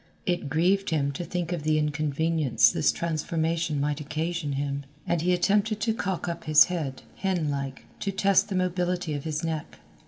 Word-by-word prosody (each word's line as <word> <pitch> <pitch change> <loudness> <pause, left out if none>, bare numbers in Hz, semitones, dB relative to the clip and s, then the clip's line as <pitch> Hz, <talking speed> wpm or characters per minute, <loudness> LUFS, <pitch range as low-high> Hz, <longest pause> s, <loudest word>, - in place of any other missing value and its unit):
It 175 -5 -1
grieved 185 +6 +2
him 140 -3 +1
to 140 +5 -5
think 175 0 -3
of 175 -3 -2
the 155 +1 +2
inconvenience 150 -4 +2
this 150 - +2
transformation 165 -1 -1
might 145 +1 -1
occasion 155 0 -2
him, 140 0 -2 0.2
and 170 - 0
he 180 +2 +2
attempted 205 +4 +2
to 225 +1 +1
cock 190 -5 -2
up 170 -1 -4
his 155 0 +8
head, 160 -7 -4
hen 180 -6 0
like, 140 -1 -4
to 200 - -1
test 195 +1 +3
the 195 - -2
mobility 180 -2 0
of 145 0 -4
his 155 0 -2
neck. 160 -2 -4
160 Hz, 180 wpm, -27 LUFS, 150-180 Hz, 0.2 s, his